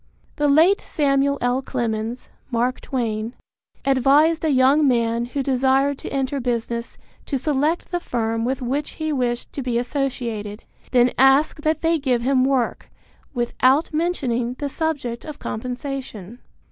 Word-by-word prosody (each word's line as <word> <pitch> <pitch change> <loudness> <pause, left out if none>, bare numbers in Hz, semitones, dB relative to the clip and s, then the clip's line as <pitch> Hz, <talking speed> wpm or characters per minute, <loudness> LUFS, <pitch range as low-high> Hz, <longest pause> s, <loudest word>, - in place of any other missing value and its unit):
The 295 - +2
late 325 +8 +5
Samuel 280 -2 +1
L. 245 +2 +1
Clemens 235 -2 -3 0.2
(Mark 245 +1 0
Twain) 230 -2 -3 0.5
advised 280 +5 +4
a 320 - +2
young 275 +2 +4
man 235 -2 +1
who 270 +3 -3
desired 270 +1 +2
to - - -6
enter 275 0 -1
business 235 -1 -3 0.3
to 275 - -1
select 300 +4 0
the 350 - 0
firm 225 -6 -2
with 255 +2 -2
which 275 +4 -2
he 315 -1 -3
wished 245 -3 -2
to 280 - -4
be 245 -2 -1
associated, 240 -5 -3 0.3
then 250 -1 +4
ask 270 +3 +4
that 310 0 0
they 330 0 +2
give 250 -4 0
him 260 0 +3
work, 265 -3 0 0.5
without 255 +6 +2
mentioning 255 -8 -1
the 285 +1 -4
subject 275 -6 -3
of 305 -2 -8
compensation. 245 -3 -6
260 Hz, 145 wpm, -22 LUFS, 240-285 Hz, 0.5 s, late